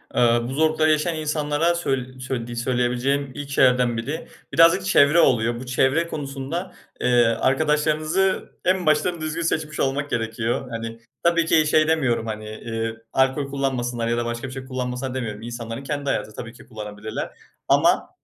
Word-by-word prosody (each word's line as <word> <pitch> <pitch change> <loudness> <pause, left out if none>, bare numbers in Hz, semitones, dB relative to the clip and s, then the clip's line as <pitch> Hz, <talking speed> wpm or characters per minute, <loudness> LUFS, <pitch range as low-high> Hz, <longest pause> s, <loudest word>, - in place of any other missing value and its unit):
Eee, - - +3 0.2
bu 125 +3 -4
zorlukları 155 +1 +3
yaşayan 155 +2 +1
insanlara 155 +2 0
söy 130 -5 -2
söylediği 120 -2 -4
söyleyebileceğim 125 +3 0
ilk 145 -1 -6
şeylerden 125 -3 +3
biri, 145 +8 -4 0.3
birazcık 170 +3 +5
çevre 155 -3 +5
oluyor. 120 -4 +3
Bu 130 - -7
çevre 130 +6 +2
konusunda, 145 +4 -5 0.3
eee, 120 -1 +4
arkadaşlarınızı 155 +9 +1 0.2
en 185 -1 +2
baştan 165 +2 +2
düzgün 155 +2 -3
seçmiş 155 -2 -2
olmak 140 +2 0
gerekiyor. 115 +2 -2
Hani, 115 0 -6 0.2
tabii 170 -1 +3
ki 155 -2 +3
şey 155 +1 +4
demiyorum, 130 -8 +1
hani, 110 0 -5
eee, 115 +1 -4 0.2
"Alkol 135 +1 +2
kullanmasınlar." 125 -4 -1
ya 120 0 0
da 120 - -1
"Başka 120 +2 -4
bir - - -8
şey 130 -1 -7
kullanmasınlar." 125 0 -4
demiyorum. 110 -5 -4
İnsanların 115 +1 -6
kendi 145 0 -3
hayatı. 110 - -2
Tabii 115 0 -7
ki - - -15
kullanabilirler 105 -1 -6 0.4
ama - - +3
130 Hz, 160 wpm, -23 LUFS, 120-155 Hz, 0.4 s, birazcık